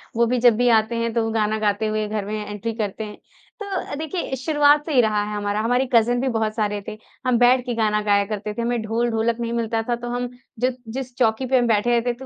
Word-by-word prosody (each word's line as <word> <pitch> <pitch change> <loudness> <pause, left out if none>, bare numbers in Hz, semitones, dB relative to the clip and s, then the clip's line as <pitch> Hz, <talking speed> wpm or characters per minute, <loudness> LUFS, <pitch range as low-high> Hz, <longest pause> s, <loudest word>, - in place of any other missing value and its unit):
वो 235 +1 +3
भी 245 +1 0
जब 240 -2 +5
भी 245 0 +3
आते 220 +2 -1
हैं 230 -1 -1
तो 230 -1 +1
वो 225 - -2
गाना 215 -1 0
गाते 210 +1 0
हुए 215 0 -1
घर 210 -2 -3
में 210 0 -4
एंट्री 210 +2 -4
करते 215 -1 -3
हैं। 210 -1 -8 0.4
तो 390 -7 -4
देखिए 315 -2 -3
शुरुआत 295 +2 +3
से 315 - -3
ही 250 - +6
रहा 210 -2 +1
है 210 0 -4
हमारा, 205 0 -1
हमारे 245 +3 +1
कज़िन 240 +1 +4
भी 265 - 0
बहुत 220 -2 -1
सारे 210 -2 -1
थे। 215 - -6 0.3
हम 245 -2 +3
बैठ 250 +1 +4
के 245 - -2
गाना 210 -2 +1
गाया 200 -1 +3
करते 210 0 -4
थे, 235 - -4
हमें 235 0 -1
ढोल-ढोलक 230 +1 0
नहीं 235 0 -2
मिलता 225 -1 -1
था 240 - +2
तो 240 0 -7
हम 245 0 -2 0.3
जब 250 0 +1 0.2
जिस 255 -2 -5
चौकी 235 +1 +1
पे 260 +1 +2
हम 240 -1 +2
बैठे 220 +1 +2
रहते 240 +1 +2
थे - - -14
230 Hz, 255 wpm, -22 LUFS, 215-245 Hz, 0.4 s, ही